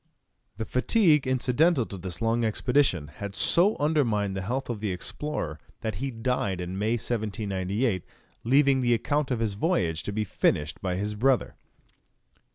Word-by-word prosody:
The 110 - -3
fatigue 150 - +3
incidental 130 +3 +2
to 100 - -8
this 90 +1 -5
long 115 +1 +1
expedition 110 - +1
had 100 +6 -7
so 190 +5 +3
undermined 115 -10 +1
the 95 - -2
health 125 +7 -3
of 120 -3 -4
the 105 -1 -2
explorer 90 - -4 0.2
that 110 - -2
he 135 - -1
died 115 -6 -1
in 90 +1 -4
May, 110 +2 +1
1798, 105 -2 -1 0.4
leaving 135 +2 +4
the 120 -1 +3
account 145 +5 -1
of 125 -3 -1
his 110 -3 0
voyage 90 - 0
to 100 - -4
be 105 +1 -1
finished 80 -5 0
by 90 -2 -1
his 105 +3 -2
brother. 125 +4 +1
115 Hz, 160 wpm, -27 LUFS, 95-130 Hz, 0.4 s, leaving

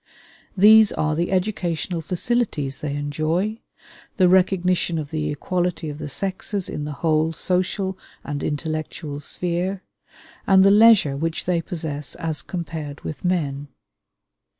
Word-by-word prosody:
These 215 +2 +7
are 155 0 0
the 170 +3 -1
educational 180 -3 -1
facilities 170 - -1
they 145 -1 -3
enjoy, 155 +9 -1 0.6
the 185 -3 +5
recognition 180 -2 +2
of 150 -2 -5
the 155 -1 -2
equality 175 +1 -2
of 145 - -9
the 150 - -5
sexes 195 +4 -2
in 150 - -4
the 150 - -4
whole 160 0 +2
social 185 +2 -1 0.2
and 145 0 -4
intellectual 155 -1 -4
sphere, 180 +5 -3 0.6
and 190 -1 +6
the 195 - +7
leisure 210 -9 +6
which 165 +3 -3
they 175 -2 +1
possess 155 -4 -5
as 160 -2 -2
compared 160 -4 -6
with 150 - -7
men. 145 -6 -1
165 Hz, 130 wpm, -22 LUFS, 150-185 Hz, 0.6 s, These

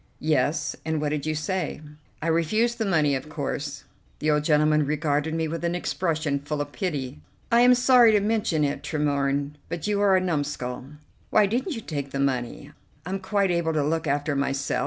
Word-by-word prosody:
"Yes, 150 0 0
and 160 -1 -1
what 150 0 -1
did 150 0 -3
you 155 - 0
say?" 155 +3 -2 0.4
"I - - -1
refused 215 +9 +1
the 220 - 0
money, 155 -6 +2
of 135 +3 -3
course." 145 -2 -4 0.3
The 155 0 +1
old 150 0 +2
gentleman 150 0 +3
regarded 150 +1 0
me 160 -1 0
with 165 +2 -5
an 170 0 0
expression 160 -5 -1
full 145 +1 -4
of 145 0 -3
pity. 145 - -3 0.3
"I 235 +1 +5
am 250 +1 +7
sorry 245 -2 +6
to 210 - +5
mention 210 -6 0
it, 140 -1 -1
Tremorne, 145 -1 -1
but 170 -1 -4
you 205 -1 0
are 200 -2 +5
a - - +3
numskull. 145 -8 -3 0.4
Why 215 - +5
didn't 245 - -1
you 225 - -5
take 145 -7 -4
the 135 - -4
money? 130 -3 -2 0.3
I'm 190 +2 -3
quite 195 0 +1
able 170 -2 0
to 150 -2 +1
look 160 +2 -1
after 145 +1 0
myself. 135 -2 -1
155 Hz, 195 wpm, -25 LUFS, 145-185 Hz, 0.4 s, am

